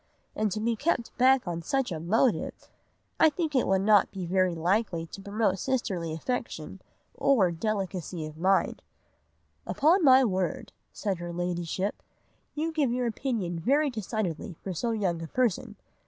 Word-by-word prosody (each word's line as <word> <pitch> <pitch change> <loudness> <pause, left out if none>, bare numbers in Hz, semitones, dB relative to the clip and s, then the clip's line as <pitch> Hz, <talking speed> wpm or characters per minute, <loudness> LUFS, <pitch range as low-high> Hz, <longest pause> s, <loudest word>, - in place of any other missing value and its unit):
And 215 -1 0
to 215 - -2
be 230 +2 0
kept 265 -2 -1
back 260 -3 +4
on 170 -1 -3
such 270 - -1
a 165 - -3
motive! 220 +9 0 0.5
I 315 - +7
think 315 0 -3
it 255 - +3
would 190 0 +2
not 210 -2 +5
be 190 -3 -6
very 185 0 +1
likely 175 0 0
to 195 - -10
promote 200 -1 0
sisterly 195 -11 -1
affection 190 -1 -4 0.3
or 215 -11 +3
delicacy 185 -3 -3
of 155 0 -8
mind.' 190 +4 +1 0.9
"'Upon 330 +6 +3
my 265 -2 +7
word,' 210 +4 -2 0.2
said 195 -5 -3
her 175 0 -5
Ladyship, 175 +2 -2 0.5
'you 315 +2 -1
give 295 -6 +1
your 250 0 0
opinion 220 -7 -2
very 280 - +2
decidedly 210 -5 -3
for 190 - -3
so 235 +8 -2
young 190 -7 -1
a 165 - -5
person. 245 -1 0
205 Hz, 155 wpm, -28 LUFS, 175-250 Hz, 0.9 s, I